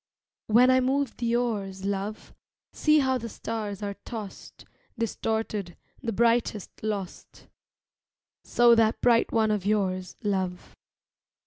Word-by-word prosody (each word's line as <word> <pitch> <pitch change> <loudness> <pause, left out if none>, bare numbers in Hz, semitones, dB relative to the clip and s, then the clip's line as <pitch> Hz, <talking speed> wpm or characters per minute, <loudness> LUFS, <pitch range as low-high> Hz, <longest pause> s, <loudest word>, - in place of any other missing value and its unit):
When 245 +4 +6
I 255 - +5
move 265 0 0
the 235 -1 0
oars, 200 -6 -2
love, 200 +2 -4 0.4
See 305 0 +3
how 260 -1 +1
the 230 0 -6
stars 210 -3 -5
are 200 0 -2
tossed, 215 -4 -8 0.3
Distorted, 220 -5 -2 0.2
the 235 -4 -2
brightest 230 -2 +1
lost. 205 -4 -5 1.0
So 240 0 +5
that 225 -1 +3
bright 235 -2 +3
one 220 -1 +2
of 210 -3 0
yours, 185 -3 -1
love. 190 -3 -2
220 Hz, 120 wpm, -27 LUFS, 200-235 Hz, 1.0 s, When